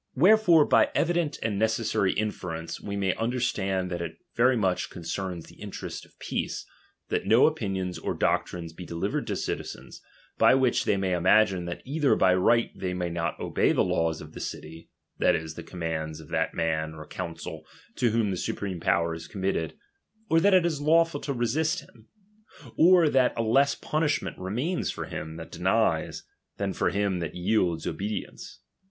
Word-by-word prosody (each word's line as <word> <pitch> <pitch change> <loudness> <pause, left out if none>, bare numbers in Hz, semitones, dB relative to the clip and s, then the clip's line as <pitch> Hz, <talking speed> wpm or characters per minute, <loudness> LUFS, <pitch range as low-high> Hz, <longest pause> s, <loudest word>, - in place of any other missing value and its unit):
Wherefore, 175 0 +6
by - - +4
evident 170 -4 +1
and 105 -3 -1
necessary 110 -3 +1
inference, 90 -6 -4
we 100 - -5
may 95 -2 +1
understand 100 -6 -1
that 85 -1 -3
it 85 -1 -5 0.2
very 125 +2 +4
much 95 -4 0
concerns 85 0 -5
the - - -17
interest - - -6
of - - -30
peace, - - -3 0.4
that - - -1
no 115 +4 +6
opinions 95 - -1
or - - -3
doctrines 85 -2 -1
be 90 - -9
delivered 85 -1 -3
to - - -1
citizens, - - -5 0.4
by - - +6
which 130 -2 +2
they 100 - +2
may 95 -1 0
imagine 90 +1 +3
that 85 0 -6
either 145 +1 +2
by 95 -1 +4
right 115 +6 +3
they 90 -1 -3
may 90 -1 -2
not 85 0 -2
obey - - +1
the - - +3
laws 80 -1 0
of 75 0 -11
the - - -8
city, 80 +1 -7 0.3
that - - +4
is, 80 0 -4
the - - -8
commands 80 -3 -4
of - - -13
that - - -1
man 80 -1 -1
or 75 -1 -9
council 80 -2 -6 0.3
to 120 - +2
whom 110 -2 +1
the 95 - -2
supreme 95 0 -3
power 85 0 +1
is 80 0 -8
committed, 95 -5 -2 0.6
or 165 - +6
that 195 +3 +5
it 180 -2 +4
is 155 -4 -1
lawful 165 0 +3
to 145 - -4
resist 135 +5 0
him, 115 -1 -20 0.7
or 175 -1 +6
that 130 -4 +2
a 115 - +1
less 135 +5 +3
pun 155 - -2
ishment 150 -3 0
remains 125 - -2
for - - -4
him 80 0 -6
that 80 0 -9
denies, - - 0 0.3
than - - -2
for - - +1
him 100 -2 0
that 85 - -4
yields 90 -2 +1
obedience. 105 +2 -5
100 Hz, 180 wpm, -27 LUFS, 85-130 Hz, 0.7 s, Wherefore